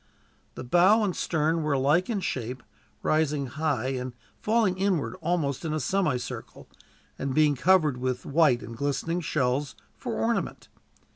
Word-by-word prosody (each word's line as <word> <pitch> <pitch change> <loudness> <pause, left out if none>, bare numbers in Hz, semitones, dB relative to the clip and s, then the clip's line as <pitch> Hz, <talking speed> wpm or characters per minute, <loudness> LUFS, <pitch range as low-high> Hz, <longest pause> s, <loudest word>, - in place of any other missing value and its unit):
The - - -6
bow 185 - +4
and 195 -4 -1
stern 160 0 0
were 150 -2 0
alike 145 - +2
in 210 -4 -1
shape, 125 -4 -4 0.4
rising 150 -2 +1
high 135 -2 -1
and 130 -1 -4 0.3
falling 210 -4 +1
inwards 185 -4 0
almost 160 -5 -1
in 160 -2 -2
a - - -1
semicircle, 150 -3 -2 0.5
and 135 -1 -2
being 150 -1 +4
covered 155 -1 +3
with 125 0 -2
white 145 -5 +3
and 115 - -8
glistening 145 +7 -1
shells, 140 -2 -1 0.2
for 240 -4 -5
ornament. 230 0 -2
150 Hz, 145 wpm, -27 LUFS, 130-180 Hz, 0.5 s, bow